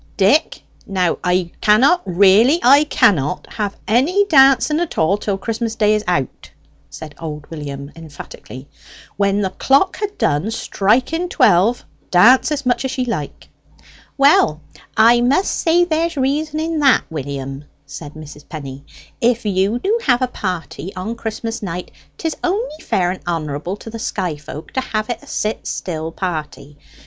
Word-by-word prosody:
"Dick! 210 - +2 0.2
Now 185 -3 0
I 180 -1 0
cannot 260 +12 +4
really, 200 - +4
I 280 +4 +6
cannot 180 - +1
have 205 -3 -3
any 295 - +2
dancing 275 -1 +4
at 345 -2 -3
all 160 +5 +3
till 205 -1 -3
Christmas 225 +2 -3
day 210 -1 +3
is 215 0 0
out," 140 -8 -2 0.4
said 155 -2 -10
old 150 -2 -6
William 140 -2 -7
emphatically. 145 -4 -11 0.5
"When 200 0 +1
the 190 -2 -1
clock 275 - +2
ha' 415 -1 -2
done 145 +9 0
striking 250 - 0
twelve, 230 - +3 0.2
dance 240 - +5
as 285 -2 -2
much 245 0 +1
as 265 0 -3
ye 255 - 0
like." 185 - -5 0.7
"Well, 275 - +4 0.4
I 235 +2 +6
must 275 +10 +2
say 345 +1 +2
there's 330 -1 -1
reason 300 +3 -1
in 320 0 -2
that, 275 -3 +4
William," 140 -1 -6 0.2
said 145 +1 -10
Mrs. 150 -1 -12
Penny. 140 -3 -8 0.4
"If 235 -1 +1
you 200 +2 +1
do 415 - 0
have 250 -1 +3
a - - +1
party 185 -5 -5
on 185 +5 -4
Christmas 225 0 -5
night, 180 -3 -5 0.3
'tis 325 -2 -3
only 380 -2 -2
fair 180 - 0
and 185 - -7
honourable 165 +2 -3
to 225 - -10
the 230 - -7
sky 190 -8 -3
folk 150 +1 -10
to 260 - -1
have 215 -2 -3
it 235 - -5
a - - -17
sit 215 +1 -3
still 160 -2 -4
party. 150 -5 -6
210 Hz, 155 wpm, -18 LUFS, 165-265 Hz, 0.7 s, I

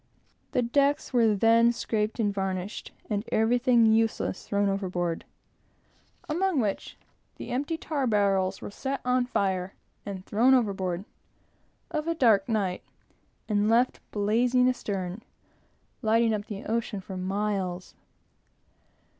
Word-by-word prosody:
The 250 - +2
decks 280 +4 +1
were 225 -4 +4
then 230 +3 +5
scraped 220 -1 -2
and 205 -3 +1
varnished, 190 0 -4 0.2
and 205 -1 -1
everything 240 +1 +3
useless 220 -3 +1
thrown 200 0 +1
overboard; 180 -4 -2 1.0
among 345 0 +1
which 210 -5 -2 0.4
the - - -8
empty 285 +6 -1
tar 290 -5 -2
barrels 195 -3 +1
were - - -6
set 270 +6 -3
on 250 0 +2
fire 190 -5 -1 0.3
and 195 -2 -7
thrown 245 +5 +4
overboard, 195 -6 -1 0.9
on 305 +1 -2
a 335 - 0
dark 225 -7 +3
night, 195 -5 0 0.7
and 210 0 +1
left 240 +3 +3
blazing 240 +5 +2
astern, 200 -5 -2 0.8
lighting 225 0 +3
up 205 -1 -3
the 205 -2 -6
ocean 225 -2 -2
for 190 0 -8
miles. 190 -1 -2
215 Hz, 120 wpm, -27 LUFS, 195-245 Hz, 1.0 s, then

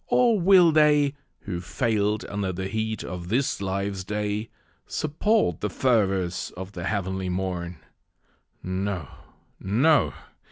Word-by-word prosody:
or 235 -4 +3
will 180 -2 +6
they, 150 -2 +4 0.3
Who 85 -1 -4
fail'd 105 +2 0
under 100 -2 -2
the 95 +1 -4
heat 110 +1 -2
of 90 -1 -6
this 125 +2 0
life's 100 0 -2
day, 105 +2 -2 0.4
Support 155 - 0
the 105 - -1
fervours 95 -7 +1
of 95 +1 -6
the 90 -3 -6
heavenly 95 -2 -2
morn? 90 -2 -3 0.9
No, 95 -3 -3 0.5
no! 135 +11 +3
100 Hz, 120 wpm, -25 LUFS, 95-125 Hz, 0.9 s, will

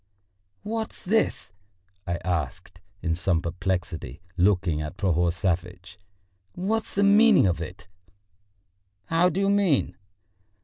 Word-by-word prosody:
"What's 220 +1 -4
this?" 220 - 0 0.6
I 85 - 0
asked 85 +1 -3 0.2
in 80 - +1
some 90 0 +1
perplexity, 90 0 -3 0.2
looking 90 -4 +2
at 75 +4 -6
Prohor 90 -3 +2
Savvitch. 90 +1 -3 0.5
"What's 215 +5 -2
the 200 - +3
meaning 205 - +6
of 90 -2 0
it?" 90 +1 -8 1.2
"How 165 - +3
do 185 - -2
you 195 - +2
mean?" 195 -9 +2
95 Hz, 115 wpm, -25 LUFS, -, 1.2 s, meaning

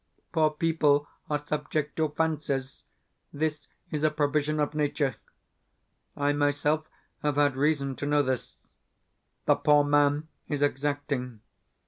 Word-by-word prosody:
Poor 155 -3 +3
people 150 -2 +2 0.2
are 150 - +2
subject 150 0 -3
to 160 -1 +2
fancies 145 -4 -2 0.5
this 150 0 -2 0.2
is 150 -1 -2
a 155 - +5
provision 150 0 0
of 150 0 0
nature. 145 -4 0 1.0
I 145 0 +2
myself 145 +2 +1 0.3
have 150 -1 0
had 145 -2 +3
reason 140 -1 +1
to 145 - -3
know 145 0 +3
this. 130 -2 -3 0.9
The - - +6
poor 145 0 +5
man 145 +1 +3 0.2
is 145 -1 -1
exacting. 140 -4 -1
145 Hz, 125 wpm, -28 LUFS, 145-150 Hz, 1.0 s, The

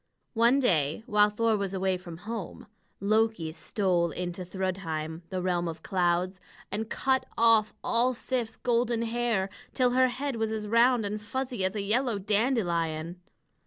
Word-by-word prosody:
One 235 +3 +4
day, 160 - +2
while 210 -3 +4
Thor 225 +1 +1
was 200 -2 -2
away 190 0 +1
from 175 -2 -8
home, 220 -5 -6 0.3
Loki 215 -5 +1
stole 175 0 0
into 180 +2 -4
Thrudheim, 175 -4 -3
the 185 -1 -3
realm 175 -1 0
of 160 -1 -6
clouds, 180 0 0 0.3
and 215 +2 -2
cut 265 -1 0
off 225 -2 +4
all 245 +2 +2
Sif's 240 -2 -3
golden 235 -1 +1
hair, 230 -4 0 0.3
till 250 -2 +3
her 255 +1 +4
head 265 0 -3
was 225 -1 0
as 215 -1 -3
round 235 +1 +4
and 210 +1 -3
fuzzy 250 -1 -3
as 190 +2 0
a 205 - -2
yellow 230 +2 +1
dandelion. 180 -6 0
210 Hz, 155 wpm, -28 LUFS, 180-235 Hz, 0.3 s, One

